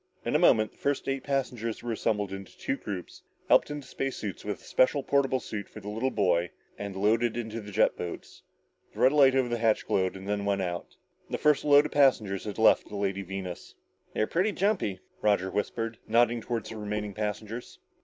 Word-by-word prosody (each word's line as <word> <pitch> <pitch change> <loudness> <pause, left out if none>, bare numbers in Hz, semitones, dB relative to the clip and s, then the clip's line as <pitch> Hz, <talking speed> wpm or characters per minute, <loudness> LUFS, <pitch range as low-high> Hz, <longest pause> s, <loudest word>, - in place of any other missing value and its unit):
In - - -1
a - - +5
moment, 110 -1 +4
the - - -28
first 140 -1 -1
eight 135 0 -1
passengers 125 -6 -2
were 120 - -3
assembled 105 -3 -1
into 95 -1 -9
two - - -1
groups, 100 -9 -7 0.3
helped - - +5
into 145 -2 -5
space 135 +1 -3
suits, 100 -4 -5
with 105 -2 -4
a - - -20
special 135 +2 +2
portable 135 -2 +2
suit 105 -4 -6
for - - -10
the 105 - -7
little 115 +5 -1
boy, 90 -7 +1 0.3
and 100 -1 -6
loaded 110 +4 +2
in 115 -2 -3
the 110 -2 -6
jet - - +3
boats. 85 - -7 0.5
The - - -9
red 130 - +6
light 135 -3 +6
over 130 -2 +3
the 120 -1 -2
hatch 110 -1 +2
glowed, 95 -1 +1
then 100 +1 -3
went 100 -1 0
out. 85 -1 -5 0.3
The - - -2
first 150 -2 +3
load 145 0 +6
of 150 - -4
passengers 110 -9 +3
had 105 - -5
left 110 - +5
the 105 - -7
Lady 100 -1 -1
Venus. 95 -2 -7 0.4
"They're 110 - +2
pretty 185 - +1
jumpy," 185 - 0 0.2
Roger 100 -3 +2
whispered, 115 +2 -2
nodding 120 +1 +3
toward 115 -1 -3
the 115 - -7
remaining 105 -1 -3
passengers. 105 +3 -5
110 Hz, 205 wpm, -28 LUFS, 100-130 Hz, 0.5 s, red